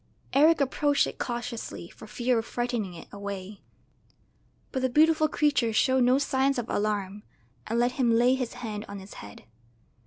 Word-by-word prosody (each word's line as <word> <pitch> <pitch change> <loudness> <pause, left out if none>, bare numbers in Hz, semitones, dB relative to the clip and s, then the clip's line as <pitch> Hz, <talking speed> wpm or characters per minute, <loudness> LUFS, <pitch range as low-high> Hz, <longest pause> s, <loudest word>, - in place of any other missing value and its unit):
Eric 310 +3 +5
approached 285 +1 +2
it - - -7
cautiously 240 -7 -5
for 220 - -13
fear 240 +2 0
of 225 - -5
frightening 240 -7 -3
it 165 - -11
away, 200 0 -7 1.1
but 260 - -2
the 260 - +1
beautiful 310 +3 +4
creature 285 -7 +1
showed 260 +3 +3
no 250 +2 +4
signs 275 -1 +1
of 240 -2 -3
alarm, 205 -1 -1 0.5
and 230 - -1
let 240 +1 +2
him 250 -1 +1
lay 240 +2 +4
his 255 -3 -2
hand 220 -4 -5
on 200 - -6
its 190 +1 -11
head. 105 0 -12
240 Hz, 165 wpm, -27 LUFS, 210-265 Hz, 1.1 s, Eric